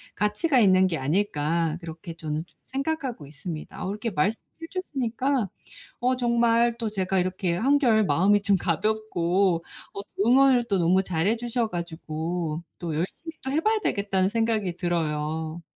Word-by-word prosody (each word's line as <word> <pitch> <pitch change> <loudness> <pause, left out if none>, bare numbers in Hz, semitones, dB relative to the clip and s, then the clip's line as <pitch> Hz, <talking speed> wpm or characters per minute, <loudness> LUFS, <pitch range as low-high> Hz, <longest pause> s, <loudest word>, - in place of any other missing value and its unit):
가치가 210 +8 +1
있는 190 -3 +5
게 165 -3 -1
아닐까?' 160 0 0
그렇게 165 0 -8
저는 155 -1 -4
좀 - - -33
생각하고 270 - -3
있습니다. 155 +4 -7
어 - - -2
이렇게 215 +3 -3
말씀해 215 - -2
주시니까 265 - -1 0.5
어 255 +1 +2
정말 235 -1 +2
또 230 -2 -2
제가 190 -2 0
이렇게 180 -1 -1
한결 245 -2 +3
마음이 195 +6 +3
좀 200 -1 +3
가볍고 180 -1 +1 0.3
어 200 - -4 0.2
응원을 255 0 +5
또 200 - +2
너무 180 +2 +3
잘해 185 +5 +1
주셔 240 0 -1
가지고 165 -2 -4 0.2
또 165 -3 -3
열심히 190 - -4
또 265 - -3
해 300 - +2
봐야 435 +2 +2
되겠다는 195 -2 +1
생각이 220 -5 0
들어요. 160 -1 -2
195 Hz, 320 characters per minute, -26 LUFS, 170-235 Hz, 0.5 s, 있는